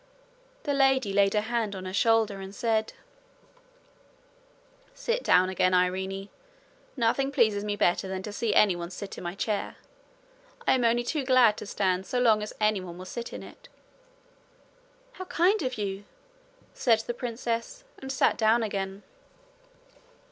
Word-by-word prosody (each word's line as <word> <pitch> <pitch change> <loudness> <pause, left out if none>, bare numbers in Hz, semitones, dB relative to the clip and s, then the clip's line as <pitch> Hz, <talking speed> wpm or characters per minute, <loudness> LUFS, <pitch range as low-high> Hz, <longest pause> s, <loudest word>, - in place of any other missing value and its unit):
The 290 - -1
lady 265 -6 +2
laid 200 0 +3
her 210 - +3
hand 220 -2 -2
on 185 -1 -7
her 185 - -5
shoulder, 220 -1 +2
and 195 +1 -9
said: 220 -1 0 2.0
'Sit - - -1
down 180 +1 +4
again, 185 -1 +2
Irene. 190 +2 -1 0.7
Nothing 260 +4 +1
pleases 210 -6 +2
me 205 0 -2
better 190 0 +1
than 190 0 -4
to 210 - -6
see 225 +1 -1
anyone 175 -4 +3
sit 195 +2 -7
in - - -9
my 175 +1 -4
chair. 205 0 -2 0.9
I - - +5
am 255 -2 +1
only 235 +1 +2
too 290 +3 -2
glad 255 -5 +5
to - - -7
stand 190 -2 -1
so 250 - -1
long 225 -4 +4
as 210 - -5
anyone 190 -5 0
will 185 - -9
sit 235 +5 -6
in - - -7
it.' - - -14 1.4
'How 370 -7 -8
kind 370 +5 +2
of 255 -3 -3
you!' 200 -1 -4 0.7
said 225 -3 +2
the 240 - -4
princess, 240 - -4 0.2
and 265 0 -6
sat 270 - +2
down 225 +1 +3
again. 195 -1 -4
215 Hz, 155 wpm, -27 LUFS, 195-245 Hz, 2.0 s, I